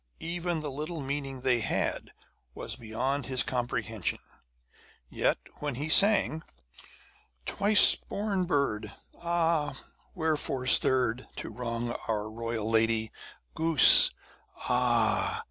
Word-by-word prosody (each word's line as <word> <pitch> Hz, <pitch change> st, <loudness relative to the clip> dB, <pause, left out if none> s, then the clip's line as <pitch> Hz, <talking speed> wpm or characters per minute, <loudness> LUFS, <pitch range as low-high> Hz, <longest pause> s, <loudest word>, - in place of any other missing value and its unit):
Even 170 Hz, -1 st, -4 dB
the 150 Hz, -2 st, -6 dB
little 155 Hz, +4 st, -7 dB
meaning 135 Hz, -1 st, -6 dB
they 125 Hz, -2 st, +1 dB
had 110 Hz, -, -3 dB, 0.5 s
was -, -, -5 dB
beyond 125 Hz, +5 st, -4 dB
his 130 Hz, -2 st, +1 dB
comprehension; 115 Hz, -5 st, -4 dB, 0.9 s
yet -, -, -1 dB, 0.2 s
when 145 Hz, -3 st, -5 dB
he 145 Hz, +5 st, -6 dB
sang 195 Hz, -4 st, +4 dB, 1.0 s
Twice 205 Hz, +1 st, +6 dB
born 200 Hz, -3 st, -4 dB
bird! 110 Hz, -, -2 dB, 0.3 s
ah! 165 Hz, -4 st, -2 dB, 0.4 s
wherefore 155 Hz, -6 st, -3 dB
stirred 125 Hz, -2 st, +2 dB
To -, -, -8 dB
wrong 120 Hz, -1 st, -5 dB, 0.2 s
our 110 Hz, -1 st, -4 dB
royal 115 Hz, -1 st, -5 dB
lady? 110 Hz, -1 st, 0 dB, 0.4 s
Goose, 160 Hz, -3 st, +7 dB, 0.5 s
ah! 120 Hz, -3 st, -1 dB
130 Hz, 105 wpm, -27 LUFS, 115-160 Hz, 1.0 s, Goose